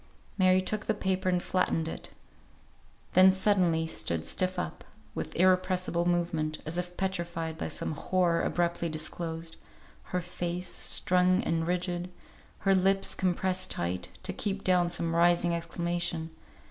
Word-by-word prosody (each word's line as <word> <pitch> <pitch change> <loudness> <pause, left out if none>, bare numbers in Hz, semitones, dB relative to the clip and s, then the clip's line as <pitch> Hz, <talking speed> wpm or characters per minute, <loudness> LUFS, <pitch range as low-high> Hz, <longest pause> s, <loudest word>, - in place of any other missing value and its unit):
Mary 185 -1 +4
took 215 +2 -2
the 220 - +1
paper 190 -1 0
and 180 -1 +1
flattened 165 -3 0
it; - - -6 1.0
then 185 +1 +8
suddenly 185 -4 +2
stood 85 - 0
stiff 185 0 0
up, 80 - -4 0.3
with - - -5
irrepressible 185 -1 +2
movement, 165 -3 0
as 165 +3 -2
if 180 0 -5
petrified 170 -4 -2
by 160 - -4
some - - -4
horror 170 +2 +1
abruptly 170 -1 0
disclosed; 160 +1 -3 0.5
her 180 - -2
face, 180 0 -4
strung 185 +3 +2
and 165 -5 0
rigid; 180 0 -1 0.5
her 195 0 +3
lips 195 +1 +3
compressed 185 0 0
tight, 90 +1 -3
to 185 0 -2
keep 200 0 -3
down 180 -2 +3
some 170 -1 0
rising 175 0 +4
exclamation. 170 -1 -2
175 Hz, 135 wpm, -29 LUFS, 165-185 Hz, 1.0 s, then